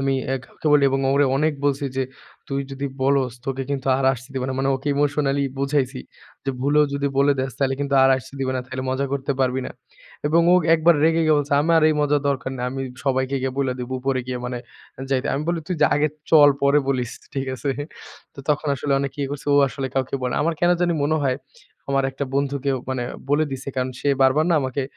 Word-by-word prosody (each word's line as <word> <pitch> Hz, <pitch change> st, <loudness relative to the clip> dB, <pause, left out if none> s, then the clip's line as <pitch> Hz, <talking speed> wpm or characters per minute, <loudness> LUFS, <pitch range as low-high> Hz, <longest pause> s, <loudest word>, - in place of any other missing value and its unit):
আমি 135 Hz, 0 st, +1 dB
অ্যা 135 Hz, -, 0 dB
কাউকে -, -, -9 dB
বলি 145 Hz, -1 st, +5 dB
এবং 135 Hz, 0 st, 0 dB
ওরে 145 Hz, +1 st, +4 dB
অনেক 155 Hz, +3 st, +2 dB
বলছি 140 Hz, 0 st, +1 dB
যে, 135 Hz, -, +1 dB, 0.5 s
"তুই 135 Hz, 0 st, -1 dB
যদি 135 Hz, +1 st, -3 dB, 0.2 s
বলস 135 Hz, -2 st, +2 dB
তোকে 135 Hz, 0 st, -2 dB
কিন্তু 135 Hz, -2 st, -3 dB
আর 135 Hz, -, -1 dB
আসতে 130 Hz, +1 st, -8 dB
দিবে 130 Hz, -1 st, -2 dB
না।" 130 Hz, -, -2 dB
মানে 135 Hz, 0 st, +1 dB
ওকে 135 Hz, +3 st, -5 dB
emotionally 145 Hz, -1 st, +1 dB
বুঝাইছি 135 Hz, -2 st, 0 dB, 0.4 s
যে 135 Hz, -, 0 dB
"ভুলও 145 Hz, +2 st, +3 dB
যদি 140 Hz, 0 st, -1 dB
বলে 140 Hz, +1 st, +5 dB
দেস 130 Hz, 0 st, -3 dB
তাইলে 135 Hz, -1 st, +1 dB
কিন্তু 140 Hz, -1 st, -1 dB
আর 135 Hz, -, +5 dB
আসতে 130 Hz, +1 st, -10 dB
দিবে 130 Hz, -1 st, 0 dB
না।" 130 Hz, -, -1 dB
তাইলে 130 Hz, 0 st, -5 dB
মজা 135 Hz, +1 st, -1 dB
করতে 140 Hz, 0 st, -1 dB
পারবি 130 Hz, 0 st, +1 dB
না -, -, -7 dB, 0.6 s
এবং 160 Hz, +3 st, +4 dB
ও -, -, +7 dB, 0.2 s
একবার 165 Hz, +1 st, +4 dB
রেগে 165 Hz, +1 st, +3 dB
গিয়ে 155 Hz, -1 st, +4 dB
বলছে 145 Hz, 0 st, -2 dB
"আমার 165 Hz, +1 st, +4 dB
এই 155 Hz, -, +2 dB
মজার 145 Hz, 0 st, +2 dB
দরকার 130 Hz, -2 st, -1 dB
নেই। 125 Hz, -, -3 dB
আমি 135 Hz, 0 st, -4 dB, 0.2 s
সবাইকে 130 Hz, 0 st, 0 dB
গিয়া 130 Hz, -1 st, -1 dB
বইলা 135 Hz, -2 st, 0 dB
দিবো, 125 Hz, +1 st, -5 dB
উপরে 130 Hz, 0 st, 0 dB
গিয়ে 125 Hz, -1 st, -3 dB
মানে 125 Hz, 0 st, -4 dB, 0.5 s
যাই।" 130 Hz, -1 st, +2 dB
আমি 140 Hz, -, -2 dB
বলি, 170 Hz, -1 st, 0 dB
"তুই 180 Hz, -, -1 dB
যা -, -, +7 dB
আগে 150 Hz, +1 st, +2 dB, 0.2 s
চল 150 Hz, -3 st, +8 dB
পরে 140 Hz, +1 st, +5 dB
বলিস।" 125 Hz, -3 st, 0 dB, 0.2 s
ঠিক 135 Hz, -1 st, -2 dB
আছে? 140 Hz, +2 st, -2 dB, 0.6 s
তো -, -, -22 dB
তখন 150 Hz, +1 st, 0 dB
আসলে 140 Hz, +1 st, -2 dB
অনেক 140 Hz, -1 st, -3 dB
ইয়ে 140 Hz, -, -1 dB
করছে 145 Hz, 0 st, -6 dB
ও -, -, +5 dB
আসলে 135 Hz, +1 st, -4 dB
কাউকে 130 Hz, -1 st, -1 dB
বলে 125 Hz, -1 st, -1 dB
না। -, -, -2 dB
আমার 165 Hz, +2 st, 0 dB
কেন 175 Hz, 0 st, +4 dB
জানি 175 Hz, -1 st, +2 dB
মনে 155 Hz, +2 st, +2 dB
হয়, 130 Hz, -2 st, +1 dB, 0.5 s
আমার 135 Hz, -1 st, +2 dB
একটা 135 Hz, +2 st, -4 dB
বন্ধুকে 140 Hz, 0 st, 0 dB
ও -, -, -3 dB
মানে 130 Hz, -2 st, -2 dB, 0.3 s
বলে 150 Hz, +2 st, +3 dB
দিছে 135 Hz, +1 st, -6 dB
কারণ 130 Hz, 0 st, 0 dB
সে 145 Hz, -, 0 dB
বারবার 135 Hz, +4 st, +4 dB
না -, -, +4 dB
আমাকে 130 Hz, +1 st, -2 dB
140 Hz, 230 wpm, -22 LUFS, 130-145 Hz, 0.6 s, চল